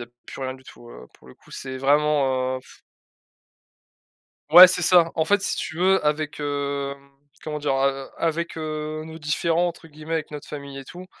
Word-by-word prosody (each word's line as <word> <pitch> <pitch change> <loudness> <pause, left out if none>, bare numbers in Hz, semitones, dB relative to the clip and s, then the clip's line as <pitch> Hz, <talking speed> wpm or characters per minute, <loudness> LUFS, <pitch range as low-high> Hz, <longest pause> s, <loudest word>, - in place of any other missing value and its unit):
y - - -5
a - - -9 0.2
plus - - -9
rien 130 0 -3
du 130 - -16
tout, 120 - -15
heu, 60 - -12
pour 65 - -19
le - - -14
coup, - - -23
c'est 130 -1 -7
vraiment, 135 -2 +1
heu, - - -8
pff - - -19 1.7
Ouais, 180 +1 +12
c'est 180 -1 -1
ça, 170 -1 +5
en 160 - +1
fait 205 +4 +2
si - - -2
tu 160 - -5
veux 190 -1 +3
avec, 150 0 -1
hem, 140 -1 -4 0.3
comment 150 -1 -4
dire, 145 -2 -1
a 135 +1 +3
heu, 135 0 -5
avec, 165 +1 -2
heu, 155 0 -4
«nos 160 0 -9
différents» 165 +3 0
entre 165 -1 -10
guillemets, 155 +1 -9
avec 160 -2 -3
notre 150 -1 -8
famille 140 -2 -8
et 135 - -9
tout, 180 +6 -11
150 Hz, 210 wpm, -23 LUFS, 140-160 Hz, 1.7 s, Ouais